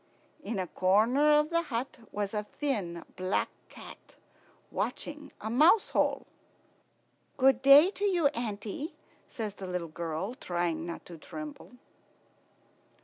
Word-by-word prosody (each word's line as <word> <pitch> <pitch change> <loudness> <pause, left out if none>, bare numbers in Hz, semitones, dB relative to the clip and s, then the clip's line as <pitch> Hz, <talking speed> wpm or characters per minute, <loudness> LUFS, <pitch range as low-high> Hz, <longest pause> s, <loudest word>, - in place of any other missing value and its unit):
In 220 0 -3
a 185 - -1
corner 220 - +3
of 300 +2 +3
the 335 0 +3
hut 265 -5 -4
was 205 0 -3
a 210 -1 -2
thin 195 - -1
black 185 +1 0 0.2
cat - - -13 0.6
watching 300 0 -4
a 215 - -6
mouse 315 - +5
hole. - - +1 1.1
"Good 265 -1 +4
day 285 +7 +8
to 410 - -3
you, 360 -6 +2
auntie," 235 - -5 0.3
says 215 -3 -5
the 195 -2 -8
little 180 -2 -3
girl, 165 +6 -4
trying 175 - -2
not 170 - -7
to 170 -2 -11
tremble. 300 - -9
225 Hz, 130 wpm, -30 LUFS, 185-295 Hz, 1.1 s, day